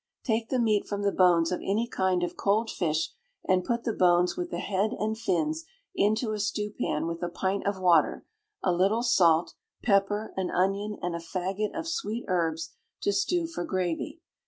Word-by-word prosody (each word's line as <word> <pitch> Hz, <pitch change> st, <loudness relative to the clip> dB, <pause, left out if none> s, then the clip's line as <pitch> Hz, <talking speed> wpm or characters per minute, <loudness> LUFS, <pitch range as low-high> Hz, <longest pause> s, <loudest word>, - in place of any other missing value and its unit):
Take 225 Hz, -1 st, 0 dB
the 260 Hz, -, +1 dB
meat 215 Hz, -4 st, +2 dB
from 205 Hz, 0 st, -3 dB
the 200 Hz, -, +2 dB
bones 175 Hz, -3 st, +4 dB
of 180 Hz, -, -1 dB
any 215 Hz, +5 st, 0 dB
kind 185 Hz, -5 st, 0 dB
of 175 Hz, -, -3 dB
cold 220 Hz, +3 st, +1 dB
fish, 160 Hz, -2 st, -1 dB, 0.4 s
and 185 Hz, -1 st, +3 dB
put 235 Hz, +4 st, -1 dB
the 230 Hz, -, -1 dB
bones 180 Hz, -1 st, +3 dB
with 355 Hz, 0 st, -3 dB
the -, -, -4 dB
head 205 Hz, +3 st, 0 dB
and 220 Hz, +1 st, -1 dB
fins 305 Hz, -, -1 dB, 0.3 s
into 215 Hz, -, +1 dB
a 215 Hz, -, -3 dB
stewpan 205 Hz, -6 st, -2 dB
with 165 Hz, 0 st, -4 dB
a 175 Hz, -, -1 dB
pint 190 Hz, +3 st, -2 dB
of 200 Hz, -1 st, -1 dB
water, 175 Hz, -4 st, +3 dB, 0.4 s
a 185 Hz, -, +3 dB
little 195 Hz, +7 st, +2 dB
salt, 170 Hz, -8 st, +4 dB, 0.3 s
pepper, 205 Hz, 0 st, +1 dB
an 190 Hz, -1 st, -1 dB
onion, 200 Hz, +3 st, 0 dB
and 175 Hz, -1 st, -1 dB
a 170 Hz, -, -3 dB
faggot 190 Hz, -, -3 dB
of 325 Hz, 0 st, -3 dB
sweet 235 Hz, -8 st, -3 dB
herbs, 165 Hz, -3 st, -1 dB, 0.3 s
to 205 Hz, -, +1 dB
stew 335 Hz, -, +1 dB
for 325 Hz, -, -4 dB
gravy. 185 Hz, -, -2 dB
200 Hz, 185 wpm, -28 LUFS, 180-220 Hz, 0.4 s, bones